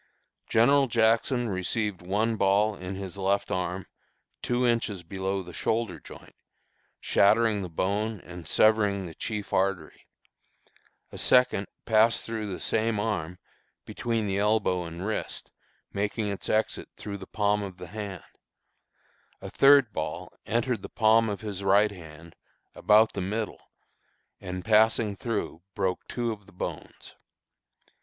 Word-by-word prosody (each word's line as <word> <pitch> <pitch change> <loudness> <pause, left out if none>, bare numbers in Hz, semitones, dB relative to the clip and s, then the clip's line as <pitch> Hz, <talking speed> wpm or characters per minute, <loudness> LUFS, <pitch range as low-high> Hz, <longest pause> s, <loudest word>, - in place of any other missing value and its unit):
General 135 +5 +4
Jackson 115 +2 +2
received 100 +1 -2
one 105 +5 0
ball 100 +1 +3
in 95 0 -6
his 95 0 -6
left 100 +1 0
arm, 90 0 -2 0.6
two 125 +1 0
inches 115 -6 0
below 95 +2 -3
the 90 0 -11
shoulder 115 0 -1
joint, - - -13 0.7
shattering 110 +1 +3
the 90 - -5
bone 100 +5 -1
and 90 -2 -10
severing 105 -2 +3
the 85 - -8
chief 105 +3 -5
artery; 95 -5 -1 1.0
a - - -8
second 125 -6 +3 0.2
passed 110 +1 +3
through 110 -3 -4
the 90 - -5
same 110 -1 0
arm, 90 -5 -2 0.5
between 115 -2 -2
the 100 -1 -1
elbow 105 -4 +1
and 85 +3 -7
wrist, 110 0 -4 0.4
making 105 +1 -1
its 100 -3 -5
exit 110 +1 0
through 100 -1 -6
the 95 - -10
palm 105 -1 +1
of 95 -3 -7
the 90 - -8
hand; 100 -3 -6 1.2
a - - -8
third 140 -5 +6
ball 80 +3 -4
entered 115 0 0
the - - -8
palm 115 0 +3
of 100 - -4
his 100 -3 -5
right 100 +2 +4
hand, 85 -3 -12 0.4
about 110 +1 +4
the - - -3
middle, 105 +4 -3 0.8
and, 90 -1 -6
passing 110 -1 +3
through, 110 -7 -3
broke 95 -2 -2
two 120 -1 -2
of 105 -3 -9
the - - -16
bones. 90 - -7
105 Hz, 140 wpm, -27 LUFS, 95-110 Hz, 1.2 s, third